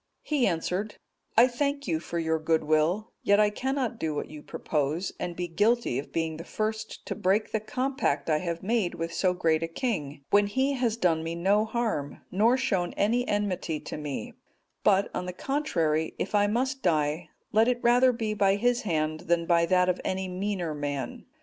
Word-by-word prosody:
He 290 -5 +1
answered, 185 +4 -2 0.4
"I 230 - +9
thank 280 +2 -1
you 160 -3 +1
for 170 +1 -5
your 160 -1 0
good 160 0 +1
will, 155 +8 +1
yet 205 +1 +4
I 210 -1 +4
cannot 255 0 -2
do 155 -2 -2
what 145 - -4
you 150 -1 -9
propose, 150 +5 -2
and 175 -1 -3
be 175 0 -3
guilty 205 - +1
of 140 - -8
being 160 -1 -2
the 165 - -7
first 215 +4 -4
to - - -3
break 205 +1 +1
the 220 - +1
compact 250 - -1
I 155 -2 +2
have 170 +1 -4
made 210 -3 0
with 165 0 -4
so 185 -2 +1
great 160 -2 +2
a 165 - -1
king, 165 - -3
when 205 0 +5
he 265 +7 +1
has 240 -4 0
done 165 -6 +2
me 165 +1 -3
no 200 +5 +2
harm, 220 -11 -2
nor 225 +7 +4
shown 195 -10 0
any 240 +5 +1
enmity 185 -6 -1
to - - -6
me; 150 -2 -5 0.5
but, 200 -1 +3
on 180 - -3
the 180 - -4
contrary, 170 - 0
if 190 - -3
I 205 0 +4
must 260 +5 -1
die, 155 -1 0 0.2
let 220 +2 +4
it 250 -1 +2
rather 245 +2 +5
be 225 -3 -2
by 200 -2 +3
his 245 +3 +1
hand 155 -5 -1
than 170 -1 +2
by 170 -1 +3
that 180 0 +3
of 180 0 0
any 190 0 -2
meaner 185 -3 -2
man. 145 -4 -4
185 Hz, 195 wpm, -28 LUFS, 160-225 Hz, 0.5 s, I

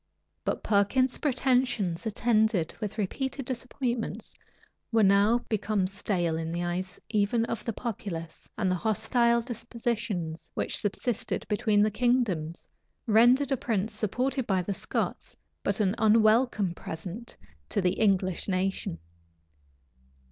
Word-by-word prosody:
But - - -2
Perkin's 240 +5 +2
pretensions, 250 - +1
attended 215 -5 +2
with 210 0 -4
repeated 265 +6 -2
disappointments, 250 -1 -3 0.6
were 225 -2 +4
now 205 +5 +4
become 210 -2 0
stale 185 -4 -1
in 165 0 -3
the 170 +1 -2
eyes 180 +2 -3
even 215 +2 +2
of 230 - -4
the 230 - -2
populace; 190 -8 -6
and 190 -3 +1
the 185 - +1
hostile 235 +2 +2
dispositions 230 -7 -3
which - - -1
subsisted 215 +2 -2
between 210 -1 +2
the 215 - +2
kingdoms, 210 -9 0 0.4
rendered 245 +5 +5
a 270 - +2
prince 220 -2 -1
supported 250 +5 -1
by 190 -2 +1
the 200 - -2
Scots - - -3 0.2
but - - 0
an 195 -2 +2
unwelcome 215 -2 +4
present 180 +8 -7 0.3
to - - 0
the 180 -2 +2
English 190 -4 +1
nation. 190 - -1
215 Hz, 125 wpm, -28 LUFS, 190-240 Hz, 0.6 s, rendered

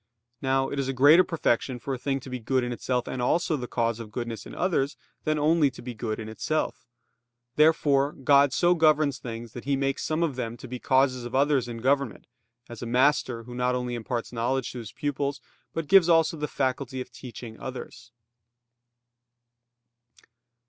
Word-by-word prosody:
Now 135 0 +1
it 140 - -3
is 135 - -1
a 135 - -1
greater 145 +7 +7
perfection 130 -6 0
for 135 +3 -4
a - - -2
thing 135 +1 -1
to 130 - -10
be 125 - -3
good 130 +3 0
in 125 - -3
itself 125 0 -2
and 130 - -3
also 165 +6 +1
the 125 -4 -4
cause 115 -1 -1
of 110 -2 -8
goodness 115 -1 -5
in - - -10
others, 145 -7 0 0.3
than 155 0 +1
only 150 0 +3
to 130 - -12
be 125 0 -5
good 110 -1 -4
in 110 - -6
itself. 125 +6 -2 0.7
Therefore 150 -2 +3
God 140 0 +4
so 175 +6 +3
governs 155 -5 +3
things 115 -2 -7
that 120 - -8
He 140 0 +1
makes 135 0 -1
some 155 +2 0
of 155 -6 -1
them 120 -2 -4
to 130 - -10
be 125 +1 -6
causes 130 -1 +2
of 120 +1 -5
others 140 -2 +2
in 115 -1 -6
government; 135 -3 0 0.4
as 120 - -9
a 120 - -4
master, 125 -1 +2
who 120 +1 -10
not 125 +1 0
only 125 -1 -2
imparts 120 +1 -4
knowledge 125 +2 -1
to 125 - -7
his 110 -4 -8
pupils, 145 -1 -2 0.3
but 165 - -3
gives 185 +1 +6
also 165 -1 +4
the 150 -1 -3
faculty 130 -1 -2
of 125 - -6
teaching 120 -2 -10
others. 125 -1 -8
130 Hz, 190 wpm, -27 LUFS, 120-145 Hz, 0.7 s, greater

